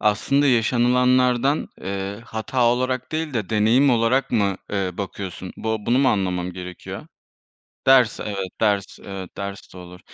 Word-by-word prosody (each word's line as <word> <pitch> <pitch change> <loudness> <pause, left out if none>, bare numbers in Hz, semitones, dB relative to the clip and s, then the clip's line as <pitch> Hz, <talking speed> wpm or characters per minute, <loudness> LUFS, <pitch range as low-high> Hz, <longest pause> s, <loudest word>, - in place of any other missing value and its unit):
Aslında 135 +7 +2
yaşanılanlardan, 125 +2 +3
eee, 100 +2 -4
hata 115 +3 -1
olarak 130 +3 0
değil 155 -3 -2
de 105 -5 -2
deneyim 115 +6 +4
olarak 120 +3 +2
mı, 100 -5 +1 0.2
eee, 95 -2 0
bakıyorsun? 95 -1 -6
Bu 110 0 -1
bunu 120 +5 +1
mu 135 -1 +4
anlamam 90 -4 -1
gerekiyor? 90 0 -8 0.8
Ders, 130 -4 +5
evet, 95 -3 -4
ders, 100 -3 0 0.4
ders 100 -1 -7
de - - -11
olur. 90 0 -11
110 Hz, 135 wpm, -22 LUFS, 100-125 Hz, 0.8 s, Ders